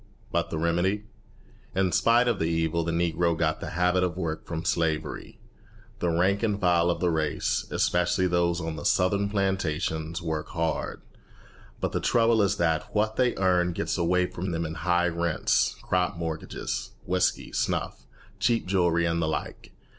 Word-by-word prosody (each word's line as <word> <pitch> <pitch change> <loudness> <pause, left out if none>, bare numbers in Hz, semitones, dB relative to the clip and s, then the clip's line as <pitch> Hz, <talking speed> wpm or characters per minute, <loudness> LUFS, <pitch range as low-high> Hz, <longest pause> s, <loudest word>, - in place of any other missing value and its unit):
But - - 0
the - - -3
remedy! 85 +5 +1 0.7
In 95 -1 +2
spite 120 +5 +4
of 115 -5 +1
the 80 - +1
evil 80 0 0
the 85 - -2
Negro 85 0 +1
got 80 -1 0
the - - -5
habit 90 +1 +3
of 90 -1 -1
work 80 -4 -3
from 80 0 -4
slavery. 80 -3 -2 0.6
The 85 - 0
rank 95 +4 +2
and 105 -3 0
file 90 -2 +3
of 85 - 0
the 90 -1 +2
race, 80 -2 -1
especially 90 +1 +1
those 85 -1 +1
on 80 -2 -4
the 75 - -6
Southern 100 +2 +2
plantations, 85 -5 -1
work 80 -3 -3
hard; 80 -1 -2 0.8
but - - -1
the - - -1
trouble 115 -2 +3
is 100 0 +1
that 80 +2 0
what 110 +1 +1
they 125 -2 +2
earn 90 -2 +2
gets - - -2
away 90 +1 +2
from 90 +1 -5
them 85 -1 -2
in 80 - -4
high 90 +1 +1
rents, 85 -1 +1
crop 90 -1 0
mortgages, 80 -2 -4
whiskey, 90 +1 0
snuff, - - -2 0.3
cheap 115 +1 +1
jewelry, 85 -3 +2
and 85 0 0
the 80 - 0
like. 80 - -4
85 Hz, 170 wpm, -27 LUFS, 80-95 Hz, 0.8 s, spite